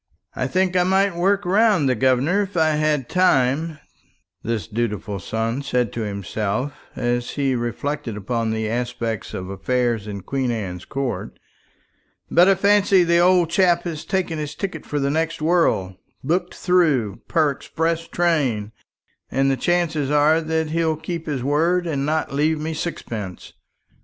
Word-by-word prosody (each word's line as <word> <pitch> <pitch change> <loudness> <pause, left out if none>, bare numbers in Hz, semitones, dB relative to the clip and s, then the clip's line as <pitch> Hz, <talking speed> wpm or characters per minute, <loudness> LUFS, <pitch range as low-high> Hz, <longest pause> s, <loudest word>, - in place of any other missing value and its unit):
"I - - -1
think 185 0 +1
I 180 - +4
might 190 +1 +2
work 195 +3 +1
round 195 -4 +3
the 130 - +3
governor 130 - +2
if 195 -2 -4
I 160 -1 +4
had 150 -4 0
time," 155 -2 +2 0.6
this 115 -2 -2
dutiful 105 -3 -3
son 115 +6 -2
said 125 -5 -1
to 115 - -3
himself, 105 +5 -3 0.2
as 120 0 -1
he 135 -2 +1
reflected 120 0 -3
upon 115 +2 -2
the 110 0 -1
aspect 120 -2 -3
of 95 - -5
affairs 120 +1 -1
in 100 -1 -5
Queen 135 +4 -2
Anne's 95 -6 -4
Court; 130 -9 -4 0.9
"but 175 +2 +6
I 195 - +5
fancy 200 -1 +4
the 170 0 +3
old 175 -2 +4
chap 175 -2 +3
has 165 -4 -5
taken 180 -5 -2
his 150 -1 -5
ticket 195 +4 -5
for 145 - -2
the 140 0 0
next 165 +2 -1
world 155 - +1 0.3
booked 170 +7 -1
through 150 - +2
per 155 -3 +2
express 165 +4 -2
train, 135 -12 0 0.6
and 135 +1 +2
the - - +2
chances 165 -3 0
are 150 +2 +4
that 160 -1 -1
he'll 165 -1 +1
keep 165 +1 -5
his 140 -5 -2
word 165 +6 +2
and 145 -4 -1
not 155 -2 -1
leave 155 +2 +1
me 160 +1 -3
sixpence. 110 - -5
150 Hz, 155 wpm, -22 LUFS, 120-170 Hz, 0.9 s, but